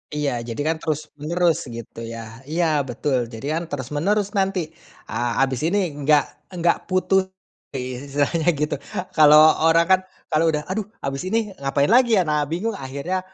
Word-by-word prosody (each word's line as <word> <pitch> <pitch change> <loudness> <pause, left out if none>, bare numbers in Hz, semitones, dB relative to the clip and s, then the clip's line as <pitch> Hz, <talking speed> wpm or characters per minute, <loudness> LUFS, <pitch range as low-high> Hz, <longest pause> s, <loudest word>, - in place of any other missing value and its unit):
Iya 140 -5 -1
jadi, 115 +3 -5
kan, 160 - +2
terus 155 -1 -3
menerus 170 +2 +1
gitu, 115 -1 -9
ya. 115 0 -9
Iya 170 +2 0 0.2
betul 125 0 -1
jadi, 115 +4 -7
kan, - - -5
terus 130 -1 -5
menerus 205 +6 +1
nanti, 195 -2 0 0.5
eee, 120 0 -1
habis 130 -2 +1
ini 185 -3 +1
enggak 145 0 +4 0.2
enggak 175 -2 0
putus 190 +1 +2 0.5
istilahnya 140 +5 -2
gitu 150 +1 -1 0.4
kalau 150 -1 +7 0.3
orang 165 +1 +5
kan 185 - +6 0.3
kalau 160 +2 +3
udah 150 -1 -1
aduh 205 0 -2 0.2
habis 135 +6 -3
ini 220 0 0
ngapain 140 +5 +1
lagi, 240 -2 +5
ya, 185 - +4
nah 150 -1 0
bingung 180 +9 -2
akhirnya 140 +3 -4
155 Hz, 160 wpm, -22 LUFS, 135-185 Hz, 0.5 s, kalau